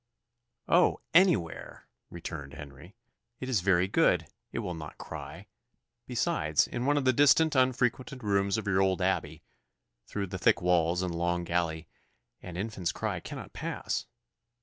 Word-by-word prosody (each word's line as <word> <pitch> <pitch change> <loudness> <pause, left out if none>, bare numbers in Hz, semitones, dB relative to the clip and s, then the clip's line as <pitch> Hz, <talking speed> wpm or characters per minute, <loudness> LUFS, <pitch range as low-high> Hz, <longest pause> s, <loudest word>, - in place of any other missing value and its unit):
"Oh! - - +4
anywhere," 165 - +2 0.2
returned 75 -5 -7
Henry. 75 - -11 0.4
"It 130 - -5
is 120 -8 +1
very 90 -1 +3
good 95 - +3 0.3
it - - -6
will 90 - -3
not 75 -2 -8
cry. - - -8 0.6
Besides, 120 - +1
in 120 +2 -3
one 145 0 +3
of 140 - 0
the 130 - +4
distant, 145 +4 +5
unfrequented 130 0 +1
rooms 100 -1 +1
of 110 - -4
your 95 -1 +2
old 95 -2 +2
abbey, - - -1 0.6
through 100 -1 -3
the 95 0 -6
thick - - +4
walls 90 0 +2
and 90 -2 -2
long 85 +1 0
gallery, 85 -2 -1 0.5
an 90 -1 -8
infant's 95 -3 -2
cry - - -3
cannot - - -8
pass. - - -3
95 Hz, 150 wpm, -29 LUFS, 85-125 Hz, 0.6 s, distant